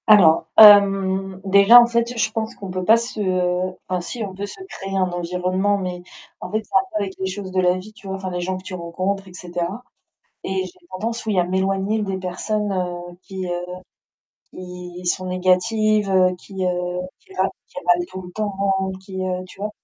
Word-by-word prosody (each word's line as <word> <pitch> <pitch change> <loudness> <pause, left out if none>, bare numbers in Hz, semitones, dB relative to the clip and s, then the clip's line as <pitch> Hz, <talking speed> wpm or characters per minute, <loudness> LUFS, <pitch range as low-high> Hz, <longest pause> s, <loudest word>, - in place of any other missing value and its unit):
Alors, 185 -7 +6
hem, 195 -2 +7
déjà 200 +5 +8
en 240 - +7
fait 235 0 -1
je 220 -1 +1
pense 220 0 -3
qu'on 195 -2 -7
peut 185 0 -3
pas 220 +5 +6
se, 235 0 -5
heu, 185 -1 0
enfin 180 -1 -1
si 225 +6 -5
on 195 -2 -5
peut 200 +2 -5
se - - -11
créer 195 - -5
un 185 -1 +1
environnement, 180 +3 0
mais 180 -2 -4 0.4
en 180 - -7
fait 215 +1 0
c'est - - -25
un 190 - +7
peu 215 - -1
avec 190 -1 -5
les 190 - -1
choses 190 0 -6
de 185 0 +1
la 180 0 +3
vie 205 +4 -10
tu 210 -2 -14
vois? 190 - -3
Enfin, 190 -1 -5
les 180 0 -3
gens 185 +1 -2
que 185 - -11
tu 190 - -8
rencontres 185 +3 -3
et 185 - -13
cetera, 180 +5 -5 0.6
et 190 0 -1
j'ai 175 -1 -14
tendance, 225 +6 -4
oui, 210 -3 0
à - - +4
m'éloigner 195 +4 0
des 195 -2 -2
personnes, 200 +3 -2
heu, 175 -2 -4
qui, 190 -1 -6
heu, 175 0 -2 0.9
qui 180 -1 -9
sont 185 +1 0
négatives, 200 +3 +2
heu, 185 -1 +4
qui, 190 +1 -6
heu, 180 0 -1 0.2
qui 385 - -18
râlent - - +2 0.2
qui - - -24
râlent 350 0 +4
tout 185 - -7
le 180 - -10
temps, 210 -1 -3 0.5
qui, 190 -1 -6
heu, 185 0 -2
tu 185 - -15
vois? 210 +1 -2
190 Hz, 210 wpm, -21 LUFS, 180-205 Hz, 0.9 s, déjà